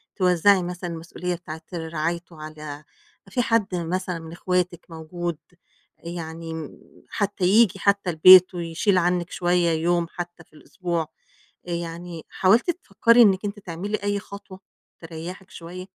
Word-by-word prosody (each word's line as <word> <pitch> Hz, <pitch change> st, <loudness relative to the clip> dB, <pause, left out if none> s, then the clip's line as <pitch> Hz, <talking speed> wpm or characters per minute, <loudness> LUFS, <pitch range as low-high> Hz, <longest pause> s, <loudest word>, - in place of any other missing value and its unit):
توزَّعي 185 Hz, +1 st, +4 dB
مثلًا 180 Hz, 0 st, -5 dB
المسئولية 170 Hz, +2 st, -4 dB
بتاعة 160 Hz, -2 st, -9 dB
رعايته 165 Hz, 0 st, -4 dB
على 155 Hz, -1 st, -8 dB, 0.5 s
في 245 Hz, -, 0 dB
حد 220 Hz, -5 st, +1 dB
مثلًا 175 Hz, +1 st, -2 dB
من 160 Hz, 0 st, -10 dB
إخواتِك 180 Hz, 0 st, -1 dB
موجود؟ 165 Hz, 0 st, -5 dB, 0.7 s
آآ -, -, -4 dB
يعني 165 Hz, -1 st, -6 dB
م 160 Hz, -3 st, -8 dB, 0.3 s
حتّى 205 Hz, -2 st, -2 dB
ييجي 200 Hz, -1 st, +4 dB
حتّى 200 Hz, -1 st, +2 dB
البيت 185 Hz, +3 st, +8 dB
ويشيل 175 Hz, +4 st, 0 dB
عنِّك 175 Hz, 0 st, +1 dB
شوية 175 Hz, -1 st, +1 dB
يوم 170 Hz, +1 st, +1 dB
حتّى 175 Hz, -1 st, -7 dB
في 155 Hz, -, -35 dB
الأسبوع، 170 Hz, +2 st, -4 dB, 0.7 s
آآ -, -, -5 dB
يعني 170 Hz, 0 st, -5 dB
حاولتِ 220 Hz, -, +3 dB
تفكَّري 235 Hz, -, +3 dB
إنِّك 195 Hz, -2 st, +4 dB
أنتِ 205 Hz, +1 st, -4 dB
تعملي 190 Hz, +4 st, -4 dB
أي 205 Hz, 0 st, 0 dB
خطوة 200 Hz, -1 st, -11 dB, 0.4 s
تريَّحِك 170 Hz, +3 st, -8 dB
شوية؟ 180 Hz, +2 st, -9 dB
175 Hz, 140 wpm, -24 LUFS, 165-190 Hz, 0.7 s, البيت